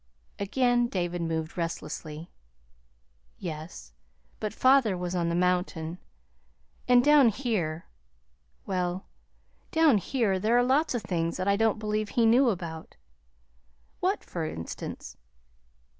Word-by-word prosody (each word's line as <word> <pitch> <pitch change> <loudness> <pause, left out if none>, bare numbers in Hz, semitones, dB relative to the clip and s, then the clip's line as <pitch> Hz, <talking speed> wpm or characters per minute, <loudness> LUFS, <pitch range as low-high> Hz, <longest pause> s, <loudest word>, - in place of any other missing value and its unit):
Again 240 +3 +2
David 175 -4 -2
moved 160 0 -3
restlessly. 165 -1 -5 1.1
"Yes; 155 - -7 0.5
but 215 - -2
father 255 -5 +4
was 180 0 -3
on 170 -2 0
the 170 - 0
mountain. 180 -2 0 0.9
And 245 0 +6
down 295 -4 +7
here 195 - -2 0.8
well, 180 -1 -2 0.6
down 315 -9 +4
here 200 -2 0
there 220 +5 +2
are 245 - +4
lots 270 +3 +2
of 230 - -2
things 170 -3 -1
that 185 +1 -2
I 200 - +4
don't 220 0 +2
believe 215 0 -2
he 235 +1 +2
knew 245 +3 +5
about." 170 -5 -5 1.0
"What, - - 0
for - - -5
instance?" 80 +1 -6
190 Hz, 120 wpm, -28 LUFS, 170-240 Hz, 1.1 s, down